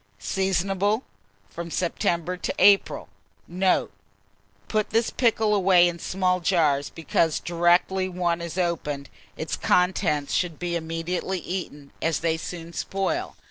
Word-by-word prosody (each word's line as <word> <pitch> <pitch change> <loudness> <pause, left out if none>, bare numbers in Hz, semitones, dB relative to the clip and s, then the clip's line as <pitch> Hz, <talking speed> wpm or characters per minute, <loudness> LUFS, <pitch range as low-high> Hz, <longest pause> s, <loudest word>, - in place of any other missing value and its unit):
Seasonable 195 - 0 0.4
from 170 +11 -7
September 170 0 -1
to 180 - -3
April. 200 -1 +4 0.4
Note. 185 +1 +1 0.8
Put 215 -1 0
this 225 +1 +1
pickle 225 -3 +2
away 185 -3 +5
in 170 -1 -4
small 185 +1 0
jars; 160 -6 +2
because 160 0 0
directly 175 +2 +2
one 175 -2 -1
is 170 +1 -6
opened, 150 -6 -2 0.3
its - - -3
contents 180 -5 +1
should 175 -4 0
immediately 170 +2 -2
be 175 - -6
eaten, 145 -6 -6
as 165 -1 0
they 165 -1 +1
soon 170 +1 -7
spoil. 195 - -2
175 Hz, 125 wpm, -25 LUFS, 165-190 Hz, 0.8 s, away